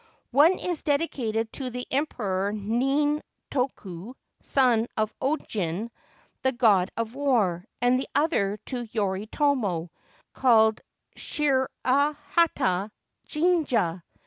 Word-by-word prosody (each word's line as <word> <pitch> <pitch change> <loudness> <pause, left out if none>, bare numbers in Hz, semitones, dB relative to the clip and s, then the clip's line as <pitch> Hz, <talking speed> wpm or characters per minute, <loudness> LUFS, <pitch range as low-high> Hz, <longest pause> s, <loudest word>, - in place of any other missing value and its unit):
One 300 +8 +5
is 350 -4 -3
dedicated 240 -7 -1
to 265 -3 -3
the 250 0 -5
Emperor 205 -9 -1
Nintoku, 250 - -2 0.3
son 240 -4 +2
of 215 0 0
Ojin, 220 - -2 0.5
the 260 - +2
God 210 -7 +3
of 230 0 -2
War, 230 -11 +1 0.2
and 250 +1 +4
the 265 - -4
other 245 -10 +1
to 245 -2 -4
Yoritomo, 205 - 0 0.4
called 220 -4 +4 0.3
Shirahata 280 - +1 0.4
Jinja. 295 - +1
245 Hz, 95 wpm, -26 LUFS, 210-285 Hz, 0.5 s, One